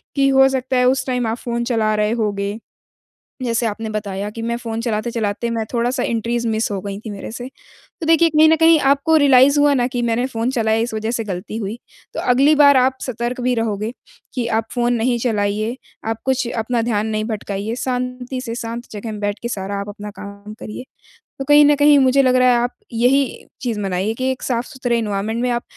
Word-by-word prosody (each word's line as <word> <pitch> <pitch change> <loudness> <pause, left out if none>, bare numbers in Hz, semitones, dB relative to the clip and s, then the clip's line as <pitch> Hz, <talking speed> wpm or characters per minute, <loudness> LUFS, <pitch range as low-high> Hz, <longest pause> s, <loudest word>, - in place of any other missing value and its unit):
कि 275 -1 +3
हो 270 0 +6
सकता 260 -1 -1
है 250 - +3
उस 260 0 0
टाइम 250 -2 0
आप 225 +2 -2
फ़ोन 235 0 -3
चला 225 -3 +1
रहे 210 +1 +1
होगे। 205 -2 -2 0.9
जैसे 235 -1 0
आपने 225 +1 -3
बताया 205 -1 -4
कि 225 +1 -7
मैं 235 +1 -1
फ़ोन 230 -1 -4
चलाते-चलाते 230 -1 -2
मैं 230 -1 -1
थोड़ा-सा 245 +2 0
एंट्रीज़ 235 +1 -1
मिस 220 0 0
हो 195 - -2
गई 200 -1 -5
थी 220 - -5
मेरे 200 +1 -7
से, 245 +2 -6 0.5
तो 320 - -3
देखिए 330 0 +5
कहीं 310 +1 +5
न 320 - +5
कहीं 325 0 +5
आपको 280 +4 +3
रियलाइज़ 280 -1 +5
हुआ 290 0 +5
ना 245 -2 +2
कि 245 -2 -3
मैंने 235 +1 0
फ़ोन 235 -1 -2
चलाया 225 -4 +1
इस 230 -1 -2
वज़ह 220 +1 -2
से 230 -2 -2
गलती 190 +2 -5
हुई। 215 +2 -4 0.4
तो - - -2
अगली 270 +5 +4
बार 285 -1 +7
आप 260 +1 +2
सतर्क 245 0 -3
भी 250 0 +1
रहोगे, 220 -1 -2 0.4
कि 245 -3 -1
आप 225 -1 0
फ़ोन 240 -1 +1
नहीं 240 +1 +1
चलाइए, 215 0 -1 0.3
आप 225 0 -3
कुछ 260 -1 0
अपना 230 0 -1
ध्यान 220 -2 0
नहीं 215 0 -1
भटकाइए। 210 0 -4
शांति 250 0 -3
से 235 -3 -5
शांत 235 +1 -5
जगह 215 +1 -6
में 210 - -7
बैठ 205 0 -2
के 235 - -2
सारा 200 -2 -4
आप 200 - -6
अपना 205 0 -8
काम 200 +1 -9
करिए। 215 +4 -7 0.5
तो 270 - -3
कहीं 295 +1 +6
न 295 - +5
कहीं 290 0 +6
मुझे 265 +1 +4
लग 255 -1 +3
रहा 255 0 +5
है 245 - +4
आप 245 +1 -1 0.2
यही 250 +4 +3 0.4
चीज़ 230 -4 -2
बनाइए 195 +2 -1
कि 260 +2 -1
एक 260 - -9
साफ-सुथरे 245 -1 -1
एनवायरनमेंट 215 +2 -2
में 250 - +1
आप 240 0 -1
235 Hz, 215 wpm, -19 LUFS, 215-255 Hz, 0.9 s, बार